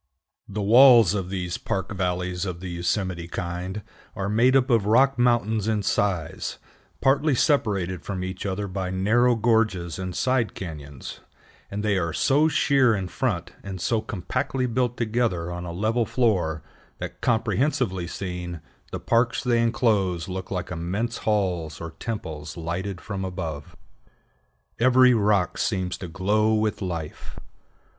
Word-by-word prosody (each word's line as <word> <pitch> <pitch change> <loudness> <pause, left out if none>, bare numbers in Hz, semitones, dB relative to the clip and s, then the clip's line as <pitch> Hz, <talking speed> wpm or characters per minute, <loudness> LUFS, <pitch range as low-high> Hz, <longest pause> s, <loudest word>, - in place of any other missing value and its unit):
The 105 +1 -3
walls 120 -2 +7
of 95 -3 -2
these 90 -2 -3
park 95 +3 -3
valleys 90 -1 -2
of 90 -3 -4
the 90 0 -6
Yosemite 85 0 -2
kind 90 +3 -4 0.3
are 100 0 -2
made 120 +5 +4
up 135 0 +3
of 110 -4 +3
rocks 130 +4 +4
mountains 115 -3 +2
in 110 -2 0
size, 95 -5 -1 0.4
partly 140 +2 +3
separated 100 - +1
from 95 -1 -4
each 95 0 -5
other 100 +1 -2
by 95 -1 -3
narrow 115 +7 +3
gorges 110 -7 +1
and 90 -1 -4
side 130 -3 +1
cañons; 75 -6 -8 0.5
and 105 +1 -4
they 100 -3 +2
are 85 -2 -2
so 145 +3 +3
sheer 135 -6 +3
in 95 -3 -3
front, 90 -4 -2
and 95 -1 -7
so 110 +5 0
compactly 110 +7 -2
built 125 0 0
together 110 -7 0
on 90 0 -5
a 85 - -5
level 110 +6 0
floor, 90 - +1 0.3
that, - - -7
comprehensively 115 - 0
seen, 90 -2 -5 0.3
the - - -4
parks 120 +1 +1
they 120 -2 +2
inclose 105 -8 +1
look 95 0 -5
like 90 -1 -4
immense 95 +8 -2
halls 90 -8 -1
or 80 0 -6
temples 80 -8 -5
lighted 90 +3 -4
from 100 -2 -5
above. 85 -6 -5 1.0
Every 130 +1 +6
rock 105 -4 +2
seems 95 -4 -1
to 90 - -6
glow 105 +5 +1
with 105 -1 0
life. 85 -5 -5
100 Hz, 145 wpm, -25 LUFS, 90-115 Hz, 1.0 s, walls